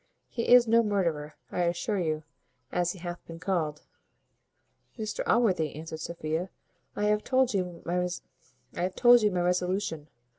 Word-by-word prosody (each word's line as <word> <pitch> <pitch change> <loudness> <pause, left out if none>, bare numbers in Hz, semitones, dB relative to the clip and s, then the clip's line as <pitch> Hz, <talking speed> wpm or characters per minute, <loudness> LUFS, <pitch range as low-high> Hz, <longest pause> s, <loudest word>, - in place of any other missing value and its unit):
He 230 - -3
is 245 -1 +8
no 230 +1 +5
murderer, 170 -9 -1 0.2
I 180 - -1
assure 175 +4 -1
you; 155 -3 -1 0.5
as 175 0 0
he - - -12
hath 175 0 -6
been 165 - -8
called." 160 -5 -2 1.1
"Mr 215 -2 -3
Allworthy," 185 - +2
answered 160 +1 -7
Sophia, 165 +2 -3 0.5
"I 205 - -2
have 210 0 +2
told 260 -2 +2
you 180 -3 -3
my 180 +4 +1
resolution. 180 -3 -1
180 Hz, 125 wpm, -28 LUFS, 165-210 Hz, 1.1 s, is